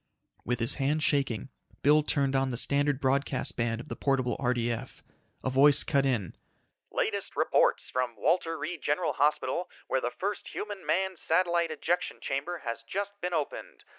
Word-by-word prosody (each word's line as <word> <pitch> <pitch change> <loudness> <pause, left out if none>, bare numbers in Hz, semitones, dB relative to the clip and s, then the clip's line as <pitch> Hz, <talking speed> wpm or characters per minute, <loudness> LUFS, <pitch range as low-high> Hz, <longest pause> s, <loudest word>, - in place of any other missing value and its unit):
With 125 0 -1
his 115 +4 0
hand 150 +3 +1
shaking, 135 -5 +1 0.3
Bill 150 +2 +6
turned 140 -2 0
on 135 0 +2
the 120 - -2
standard 145 +1 +2
broadcast 135 0 0
band 115 -1 -1
of 120 - -9
the - - -5
portable 130 -4 +1
RDF. 120 0 -2 0.4
A - - 0
voice 140 +2 +6
cut 140 -1 +2
in: 110 -10 -1 0.3
"... - - -51
latest - - -2
reports - - +2
from 125 -2 -1
Walter 165 - +1
Reed 155 +2 -5
General 150 +4 0
Hospital 150 +5 +1 0.2
where 130 - 0
the 120 - 0
first 200 +10 -4
human 205 -2 -5
manned 190 -2 0
satellite 170 0 +2
ejection 165 +3 -1
chamber 160 +6 -3
has 115 0 -3
just 200 +1 -2
been 180 -1 -1
opened. 150 -3 -4
140 Hz, 165 wpm, -29 LUFS, 130-165 Hz, 0.4 s, Bill